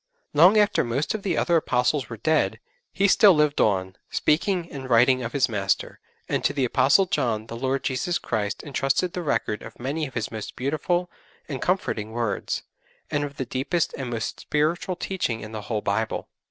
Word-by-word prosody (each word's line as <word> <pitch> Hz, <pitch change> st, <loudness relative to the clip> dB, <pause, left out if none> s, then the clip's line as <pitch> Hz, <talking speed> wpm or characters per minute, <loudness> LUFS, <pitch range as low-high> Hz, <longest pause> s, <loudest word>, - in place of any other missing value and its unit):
Long 175 Hz, +8 st, +7 dB
after 210 Hz, 0 st, +3 dB
most 125 Hz, +5 st, -1 dB
of 215 Hz, -, -3 dB
the 185 Hz, -5 st, -1 dB
other 170 Hz, -1 st, +3 dB
Apostles 135 Hz, -1 st, +1 dB
were 115 Hz, -, -6 dB
dead, 155 Hz, +8 st, +1 dB, 0.3 s
he 200 Hz, -, +2 dB
still 200 Hz, -1 st, +6 dB
lived 150 Hz, -1 st, +2 dB
on, 95 Hz, -2 st, +1 dB
speaking 170 Hz, +3 st, +1 dB
and 130 Hz, -2 st, -7 dB
writing 125 Hz, +2 st, +5 dB
of 115 Hz, -1 st, -4 dB
his 135 Hz, -3 st, +3 dB
Master, 100 Hz, -5 st, -1 dB, 0.3 s
and -, -, -1 dB
to -, -, +2 dB
the 135 Hz, -3 st, +1 dB
Apostle 130 Hz, +10 st, +4 dB
John 115 Hz, -10 st, -1 dB
the 115 Hz, -, -8 dB
Lord 130 Hz, +3 st, -1 dB
Jesus 140 Hz, +7 st, 0 dB
Christ 105 Hz, -3 st, -3 dB
entrusted 140 Hz, +5 st, 0 dB
the 180 Hz, -, -3 dB
record 110 Hz, -9 st, -1 dB
of 115 Hz, -, -11 dB
many 145 Hz, +5 st, -2 dB
of 130 Hz, -, -14 dB
His 115 Hz, -4 st, -2 dB
most 110 Hz, -2 st, -6 dB
beautiful 155 Hz, +7 st, -1 dB, 0.4 s
and 135 Hz, -4 st, -5 dB
comforting 110 Hz, -, -1 dB
words, 115 Hz, -3 st, -2 dB, 0.5 s
and 145 Hz, -, 0 dB
of 145 Hz, -1 st, -6 dB
the 130 Hz, -, -2 dB
deepest 140 Hz, +8 st, -1 dB
and 130 Hz, -3 st, -5 dB
most 115 Hz, -2 st, -3 dB
spiritual 160 Hz, +5 st, 0 dB
teaching 175 Hz, -12 st, -2 dB
in 105 Hz, -, -8 dB
the 110 Hz, -1 st, -5 dB
whole 105 Hz, 0 st, -3 dB
Bible. 110 Hz, +3 st, -1 dB
135 Hz, 190 wpm, -25 LUFS, 115-165 Hz, 0.5 s, Long